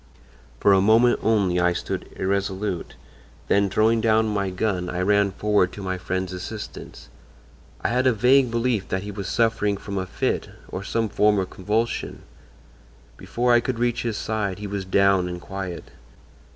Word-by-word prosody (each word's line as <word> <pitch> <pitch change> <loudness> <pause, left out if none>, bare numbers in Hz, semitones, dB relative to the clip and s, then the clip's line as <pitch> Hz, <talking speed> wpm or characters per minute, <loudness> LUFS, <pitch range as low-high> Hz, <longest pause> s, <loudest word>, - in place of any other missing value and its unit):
"For 100 - +5
a 95 - +5
moment 115 +4 +4
only 100 -5 +2
I 90 0 +3
stood 85 - -4
irresolute, 95 -1 -2 0.5
then 100 0 +3
throwing 110 +3 +2
down 110 0 +3
my 100 -2 -1
gun 90 -2 -2
I 90 - -3
ran 100 +1 +3
forward 100 -1 +1
to 100 - -8
my 95 -1 -3
friend's 95 0 -3
assistance. 100 +4 -8 0.7
I - - 0
had 125 +2 +2
a - - +5
vague 125 +4 +4
belief 115 -3 0
that 95 +1 -2
he 105 - -6
was 100 -2 -6
suffering 105 -2 +1
from 100 0 -5
a 95 - -4
fit, - - -2 0.2
or 95 - -5
some 115 +2 -1
form 105 0 +2
of 95 -1 -2
convulsion. 110 +5 -2 0.9
Before 120 +1 0
I 120 - +6
could 120 0 -3
reach 120 0 0
his 115 -3 -2
side 105 -4 -2
he 105 - -7
was 100 -1 -4
down 95 -1 +3
and 90 0 -5
quiet. 95 -1 -7
100 Hz, 170 wpm, -24 LUFS, 95-110 Hz, 0.9 s, I